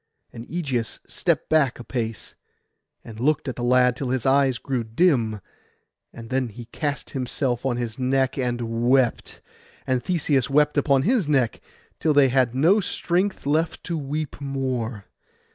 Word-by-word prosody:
And 115 0 -9
Ægeus 135 -9 -2
stepped - - -1
back 150 -5 +2
a 120 - -9
pace, 115 -3 -4 0.7
and 110 -1 -10
looked 145 +3 +1
at 130 - -3
the 120 - -5
lad 125 0 +4
till 130 0 -4
his 130 -2 -1
eyes 135 -2 +3
grew 130 -3 -2
dim; 115 - +1 0.7
and 115 0 -11
then 130 -1 +1
he 115 +2 -10
cast 145 +4 -4
himself 130 -1 -1
on 120 -2 0
his 120 0 -4
neck 130 0 +1
and 125 -3 -1 0.3
wept, 130 -3 +1 0.4
and 130 -2 0
Theseus 140 -7 +1
wept 150 +1 +3
on 135 -1 +4
his 225 - +2
neck, 130 -6 +1 0.4
till 155 -2 +1
they 140 -2 +6
had 125 -2 +2
no 170 +10 +4
strength 185 -1 -1
left 160 +3 0
to 170 - -3
weep 150 0 -4
more. 130 -6 -3
130 Hz, 160 wpm, -24 LUFS, 120-145 Hz, 0.7 s, they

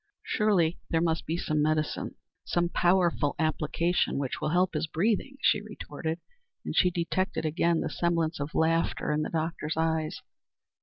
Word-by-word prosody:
"Surely 185 -6 +2
there 165 - +2
must 165 -1 0
be 165 - 0
some 155 -3 0
medicine 155 0 0 0.3
some 175 0 0
powerful 175 -5 +2
application 165 +2 0
which 140 -2 -3
will - - 0
help 180 +2 +2
his 155 +1 -1
breathing," 220 - 0
she - - +3
retorted, 165 -6 -5 0.5
and - - -3
she 180 - +5
detected 175 0 -1
again 165 +1 +2
the - - -1
semblance 170 -2 0
of 145 +2 -4
laughter 165 -1 +1
in 150 0 +1
the - - -2
doctor's 160 -1 -2
eyes. 160 -1 0
165 Hz, 155 wpm, -28 LUFS, 155-175 Hz, 0.5 s, she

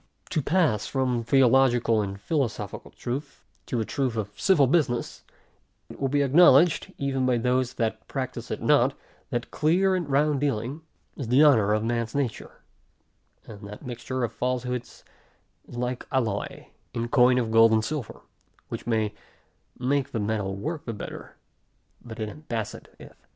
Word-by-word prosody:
To 155 - +1
pass 145 - +1
from 125 -3 0
theological, 120 -2 +4
and 100 -1 -5
philosophical 115 - -3
truth, 135 +3 -6 0.2
to 125 - -2
the 110 - 0
truth 130 -3 -1
of 105 -2 -3
civil 150 - +4
business; 130 -4 0 0.7
it - - -12
will 135 - 0
be 145 +1 +2
acknowledged, 155 +2 +5
even 135 -2 -1
by 125 -1 +3
those 125 +1 0
that 115 -2 -2
practise - - -5
it - - -4
not, - - +3 0.3
that 120 0 -3
clear, 180 +5 +2
and 175 -5 -2
round 145 +1 +2
dealing, 135 +2 -2 0.3
is 135 - -5
the 130 +6 +5
honor 115 -9 +5
of 105 0 +1
man's 115 0 -2
nature; 135 -6 -4 0.8
and 105 -1 -11
that 105 +1 -10
mixture 125 +1 -4
of 115 - -1
falsehoods, 125 -1 -3 0.6
is - - -11
like 125 0 -3
alloy 115 -7 -2 0.3
in 115 0 -1
coin 125 +1 +4
of 115 -3 0
gold 115 0 +6
and 110 0 +2
silver, 145 -6 -5 0.5
which - - -6
may 110 -2 0 0.6
make 135 +1 0
the 115 - -1
metal 100 -2 -2
work 155 - -4
the 115 - -4
better, 105 - -8 0.7
but 115 -1 -9
it 110 - -2
embaseth 115 -3 -6
it. - - -13
125 Hz, 155 wpm, -26 LUFS, 115-140 Hz, 0.8 s, gold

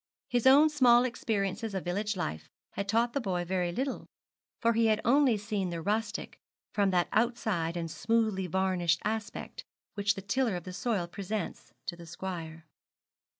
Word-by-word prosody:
His 245 +1 +2
own 290 +4 +8
small 245 -5 +6
experiences 220 -3 -2
of 190 - -2
village 205 +3 -1
life 80 - -4 0.2
had 200 0 -4
taught 235 +2 +2
the 280 - 0
boy 180 -5 -1
very 180 -1 0
little; 265 +8 -3 0.5
for 230 0 +3
he 230 0 +3
had 215 -1 +3
only 260 -2 +4
seen 205 -2 -2
the 170 -1 -4
rustic 215 +5 -2 0.3
from 200 -2 +2
that 180 -2 +2
outside 215 -7 0
and 165 -1 -3
smoothly 215 -3 +1
varnished 180 -2 +1
aspect 215 0 -4 0.3
which 200 0 +1
the 195 - -7
tiller 230 +1 +1
of 175 - -5
the 185 - -7
soil 205 -3 -1
presents 200 - -5
to 175 - -3
the 170 -1 -12
squire. 165 -2 -6
200 Hz, 165 wpm, -30 LUFS, 180-230 Hz, 0.5 s, own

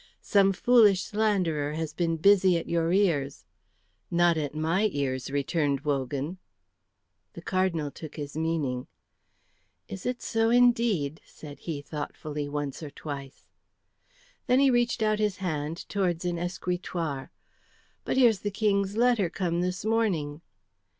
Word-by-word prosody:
"Some 195 -2 +4
foolish 205 -2 +4
slanderer 180 -9 0
has 160 0 -4
been 165 -2 0
busy 190 0 +5
at 165 - -5
your 165 0 +1
ears." 165 -8 +1 0.6
"Not 175 -1 +3
at 150 -2 -3
my 170 +7 +1
ears," 130 -4 -2
returned 140 0 0
Wogan. 145 +4 -2 0.9
The - - -10
Cardinal 180 -6 0
took 155 0 -10
his 145 -2 -6
meaning. 155 -6 -1 1.0
"Is 195 +2 -6
it 250 -1 -3
so, 225 0 +1
indeed?" 230 - +3
said 145 -2 -12
he, 150 -4 -5
thoughtfully, 150 -1 -5
once 145 -1 -4
or 155 - -6
twice. 140 -2 -8 1.0
Then 250 +1 +4
he 275 -1 +5
reached 240 -2 +1
out 215 0 +1
his 210 -3 0
hand 160 -3 -4
towards 180 -4 -1
an 175 -1 -1
escritoire. 175 -5 -3 0.7
"But - - -2
here's 235 -6 +5
the 205 - -2
King's 200 -1 0
letter 235 -6 +3
come 175 -1 -1
this 180 +2 -2
morning." 180 -10 0
170 Hz, 135 wpm, -27 LUFS, 150-205 Hz, 1.0 s, busy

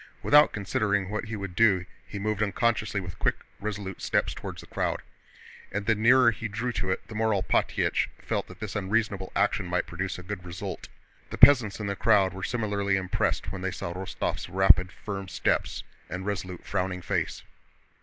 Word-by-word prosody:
Without 150 +1 +6
considering 100 -1 0
what 105 - -2
he 110 +1 -5
would 95 -3 -6
do 95 -5 +4 0.2
he 100 - -6
moved 105 +1 -1
unconciously 105 0 +1
with 90 -2 -8
quick, - - +2 0.2
resolute 100 -2 -5
steps - - +1
toward - - -7
the - - -10
crowd. - - -2 0.7
And 105 +1 -3
the 110 - +4
nearer 115 +3 +5
he 115 +1 -5
drew 110 +4 -2
to 95 -5 -2
it 95 - -2
the - - -9
more 110 +1 +1
Alpátych 95 - +1
felt - - -3
that - - -13
this 110 -1 -5
unreasonable 100 -1 -1
action 100 -1 +1
might 90 -1 0
produce 95 +2 -4
good 90 +1 -6
results. 90 -1 -6 0.4
The - - -6
peasants 115 -8 +7
in 105 - -3
the 100 0 -2
crowd 100 -2 +3
were 95 - -7
similarly 105 -4 0
impressed 95 -1 -1
when 95 -1 -5
they 95 - -1
saw 85 -2 -5
Rostóv's 95 +1 -3
rapid, 95 -1 +5
firm 100 -2 -6
steps 85 - -1 0.3
and 95 +2 -5
resolute, 95 -3 -4
frowning 90 -2 -2
face. - - -2
100 Hz, 180 wpm, -27 LUFS, 95-110 Hz, 0.7 s, peasants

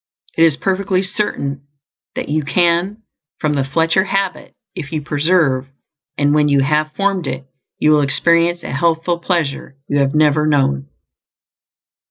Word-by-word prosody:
It - - 0
is 155 -3 +2
perfectly 190 -1 0
certain 140 -9 -3 0.5
that - - -4
you 155 +1 0
CAN 175 +8 +1 0.4
form 150 -1 0
the 140 -2 0
"Fletcher 165 +7 +1
habit" 195 -1 -3 0.2
if 145 - -7
you 155 -2 -3
persevere; 145 -3 +1 0.5
and 145 0 +2
when 150 -1 +3
you 140 -1 +3
have 150 +2 +1
formed 195 -5 -1
it, 130 +1 -5 0.3
you 155 - +3
will 150 -1 +4
experience 170 +4 +2
a - - -6
healthful 165 +3 0
pleasure 165 -6 -2
you 145 - 0
have 140 +1 +1
never 150 0 +3
known. 70 - +1
155 Hz, 150 wpm, -17 LUFS, 140-175 Hz, 0.5 s, will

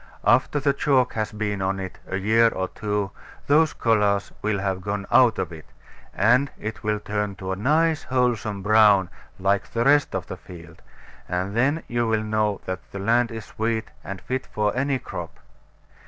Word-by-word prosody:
After 120 +7 +3
the 140 0 +2
chalk 135 -3 +2
has 110 -1 -2
been 105 -2 -3
on 95 +1 -1
it 95 -1 -7
a 95 - -2
year 110 +4 +4
or 95 -4 -3
two, 105 -2 -2 0.3
those 155 +2 +4
colours 105 -3 +1
will 110 -1 0
have 95 -1 -1
all - - -12
gone 100 +1 -3
out 125 -4 +5
of 85 - -2
it; 80 -2 -11 0.4
and 125 +7 +3
it 110 +1 -6
will 105 0 0
turn 105 -1 -3
to 95 0 -5
a - - -1
nice 155 - +2
wholesome 115 -6 -1
brown, 105 -3 +5 0.3
like 100 +1 0
the 115 - +1
rest 145 +1 +4
of - - -2
the - - -7
field; 85 -2 -13 0.5
and 95 +3 -2
then 140 +7 +1
you 120 -1 0
will 110 -1 +1
know 110 -1 0
that 95 0 -3
the - - -6
land 115 +4 +2
is 110 -2 -7
sweet, 110 0 -2
and 95 -1 -6
fit 130 +1 -3
for 105 0 -1
any 135 +1 +1
crop. - - -7
105 Hz, 185 wpm, -24 LUFS, 100-120 Hz, 0.5 s, out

